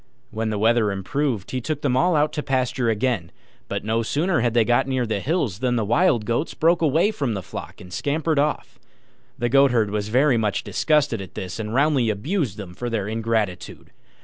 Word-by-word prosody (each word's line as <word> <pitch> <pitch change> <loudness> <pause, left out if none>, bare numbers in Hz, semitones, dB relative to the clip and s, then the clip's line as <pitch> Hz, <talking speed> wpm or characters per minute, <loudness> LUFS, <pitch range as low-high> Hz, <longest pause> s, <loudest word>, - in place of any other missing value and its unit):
When 110 0 -2
the 105 - -2
weather 110 0 +3
improved, 110 +2 -2
he 130 - -2
took 150 +3 -4
them 130 -3 +1
all 160 +7 +3
out 150 0 +2
to 150 - -2
pasture 130 -3 0
again; 110 -5 -1 0.4
but 100 - -3
no 110 +2 0
sooner 155 +9 0
had 120 0 0
they 115 -2 +4
got 120 +3 +2
near 130 -2 0
the 110 -3 -1
hills 130 - -1
than 125 -1 0
the 115 -3 0
Wild 120 - +2
Goats 120 +8 -1
broke 165 +1 +2
away 160 +7 +3
from 135 - -2
the 95 - -4
flock - - -8
and 90 0 -12
scampered 150 - 0
off. 140 -3 -2 0.6
The 120 -2 0
Goatherd 120 -5 +3
was 105 -1 -2
very 130 +3 +3
much 105 -3 0
disgusted 145 -8 +1
at 95 - -10
this, 90 +3 -5
and 105 -1 -4
roundly 135 -2 +2
abused 125 - -2
them 95 -4 -8
for 120 +6 -4
their 105 -4 -2
ingratitude. 110 -4 -3
120 Hz, 200 wpm, -23 LUFS, 110-145 Hz, 0.6 s, they